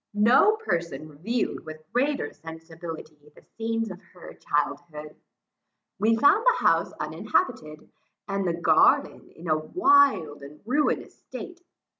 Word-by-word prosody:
No 245 - +5
person 170 - -3
reviewed 190 +11 -3
with 155 0 -10
greater 270 - 0
sensibility, 160 -1 -10
the - - -19
scenes 225 -1 -2
of 185 +1 -10
her 180 - -11
childhood. 150 +1 -3 0.8
We 220 +3 +3
found 285 - +4
the - - +2
house - - +3
uninhabited, 155 - -2 0.4
and 195 -1 -2
the 170 - 0
garden 160 -2 +3
in 170 +2 -10
a 155 -1 +2
wild 270 - +3
and 140 +2 -12
ruinous 290 +6 -1
state. 355 -1 -10
175 Hz, 125 wpm, -25 LUFS, 155-245 Hz, 0.8 s, No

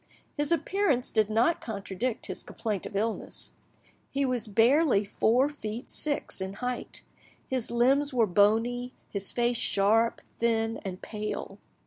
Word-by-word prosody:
His 295 +1 0
appearance 330 -4 +1
did 215 -2 +2
not 230 +10 +2
contradict 215 +2 -3
his - - -4
complaint 210 -5 -4
of - - -11
illness; 220 +3 -2 0.6
he 275 0 0
was 250 -3 0
barely 230 +1 +4
four 235 +6 +2
feet 240 -5 -6
six 290 -9 -2
in 190 +1 -3
height, 250 +4 -4 0.4
his 255 -3 -2
limbs 270 +5 +3
were 240 -3 +3
bony, 225 +6 +2 0.2
his 200 -1 -2
face 240 0 +2
sharp, 220 +4 +3 0.2
thin, 225 -1 +1
and 185 -2 -6
pale. 215 -1 -5
230 Hz, 135 wpm, -28 LUFS, 210-255 Hz, 0.6 s, barely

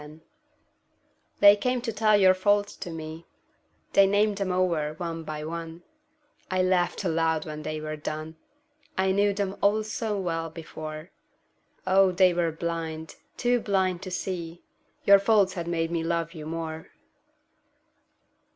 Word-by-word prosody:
Faults 155 +2 -13 1.2
They 205 0 +9
came 250 +4 -1
to 230 -2 -3
tell 215 0 +4
your 190 -2 +6
faults 205 +2 +1
to - - -7
me, 160 0 -8 0.7
They 195 0 +6
named 205 +1 +2
them 195 -2 -1
over 170 -5 0
one 165 -2 -5
by 155 -1 -5
one; 165 +1 -6 0.7
I 185 0 +1
laughed 185 +1 +1
aloud 165 -2 0
when 155 -1 -6
they 155 0 -4
were 155 0 -5
done, 155 +1 -5 0.6
I 190 0 +2
knew 200 +1 +3
them 200 -1 -3
all 210 +2 +3
so 215 -1 -3
well 165 -3 -2
before, 155 0 -8 0.7
Oh, 190 0 +4
they 180 0 +4
were 170 -1 0
blind, 160 -1 -5 0.2
too 245 0 +2
blind 190 -4 0
to 190 - -6
see 175 -2 -5 0.4
Your 200 0 +8
faults 200 -2 +3
had 170 -2 -5
made 165 -1 -1
me 165 -1 -1
love 165 0 -1
you 155 -3 -8
more. 160 -1 -5
175 Hz, 150 wpm, -26 LUFS, 160-195 Hz, 1.2 s, They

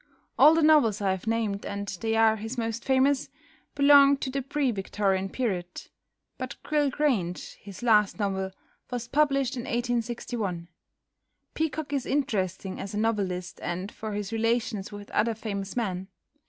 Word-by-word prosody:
All 310 +2 +7
the 325 - +3
novels 290 -9 +5
I 195 -2 +1
have 190 +2 -4
named, 220 -3 0
and 200 0 -4
they 225 0 0
are 225 0 +4
his 225 +4 -6
most 230 0 -2
famous, 270 +1 +2 0.5
belong 280 0 +7
to 265 - -4
the 275 +1 -1
pre 270 0 0
Victorian 195 -2 -1
period, 185 -7 -3 0.6
but - - -4
"Gryll 295 -2 +1
Grange," 240 - -1
his 200 +2 -10
last 210 -4 +4
novel, 190 -2 -1 0.4
was 245 -1 -4
published 275 -1 +2
in 240 - -5
1861. 235 -6 -2 0.8
Peacock 310 -2 -2
is 275 -3 -1
interesting 195 -9 -1
as 200 +1 -5
a - - 0
novelist 185 -5 -1
and 180 +3 -4
for 220 -1 -6
his 205 +1 -4
relations 225 -2 0
with 205 0 -9
other 225 +1 +1
famous 200 -3 -5
men. 190 -6 -2
225 Hz, 155 wpm, -27 LUFS, 195-260 Hz, 0.8 s, All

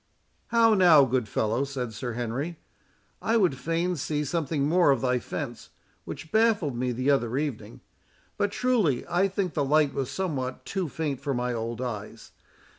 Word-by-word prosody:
"How 230 -1 +4
now, 175 -8 +7
good 125 -2 0
fellow?" 110 +5 0
said 130 -4 -4
Sir 120 +2 -4
Henry; 125 +8 -3 0.6
"I 225 +1 +2
would 185 -10 +3
fain 165 +6 -1
see 150 0 -2
something 150 -2 -1
more 170 0 +4
of 135 -4 +3
thy 125 -1 +1
fence, 120 -2 -6 0.4
which 160 - -8
baffled 215 - +2
me 125 +1 -1
the 130 +4 +1
other 125 -3 +1
evening; 145 -6 -4 0.5
but 205 - 0
truly, 215 - +1
I 180 +3 +2
think 195 -2 -2
the 145 - 0
light 145 0 +3
was 135 -2 -2
somewhat 140 -9 -3
too 190 -5 -2
faint 145 -3 -3
for 140 -3 -2
my 125 0 -1
old 115 +1 -4
eyes. 115 -2 -6
140 Hz, 170 wpm, -27 LUFS, 125-175 Hz, 0.6 s, now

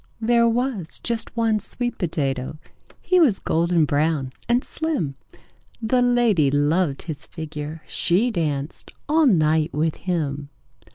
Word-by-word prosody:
"There 235 +1 +3
was 230 -8 -2
just 235 0 -4
one 225 -2 +2
sweet 240 +3 -4
potato. 140 -5 -2 0.5
He 365 - +3
was 260 - +4
golden 170 0 +1
brown 145 -2 0 0.2
and 245 +2 +3
slim: 300 - -1 0.7
The 240 +2 +1
lady 240 - +3
loved 145 +2 +1
his 160 -1 -7
figure. 155 -1 -7
She 185 +8 +1
danced 150 -5 -2 0.2
all 310 +1 +4
night 160 -5 +3
with 155 +1 0
him. 145 -6 -2
170 Hz, 125 wpm, -23 LUFS, 150-235 Hz, 0.7 s, was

